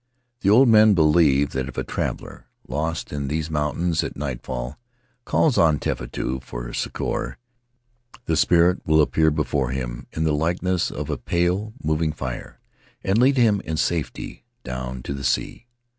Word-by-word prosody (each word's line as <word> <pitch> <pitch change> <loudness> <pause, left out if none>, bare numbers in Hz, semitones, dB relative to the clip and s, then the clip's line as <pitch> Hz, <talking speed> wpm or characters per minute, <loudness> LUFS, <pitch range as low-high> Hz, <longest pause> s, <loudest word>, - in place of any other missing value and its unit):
The 100 - +1
old 125 +6 +7
men 110 -2 +6
believe 75 -4 +4
that 65 0 -3
if 65 - -10
a - - 0
traveler, - - -5 0.2
lost 75 +6 -3
in 70 -1 -3
these 80 +2 -2
mountains 80 +3 0
at - - -5
nightfall, 65 - -5 0.5
calls 150 -6 +2
on 80 -3 +4
Tefatu 65 0 -3
for - - -7
succor, - - -3 0.9
the - - +1
spirit 90 +1 +4
will 80 0 +3
appear 80 +1 +3
before 75 -4 -1
him 60 -2 -4
in 80 - -1
the 80 -1 +2
likeness 85 +3 0
of - - -5
a - - -3
pale, 90 +5 0
moving 80 0 0
fire, 65 -5 -6 0.4
and 95 +3 +2
lead 135 +2 +4
him 110 -5 +4
in 80 0 -3
safety 80 -1 -2 0.2
down 65 0 -5
to - - -4
the 70 0 -6
sea. 95 - -1
80 Hz, 160 wpm, -23 LUFS, 65-90 Hz, 0.9 s, old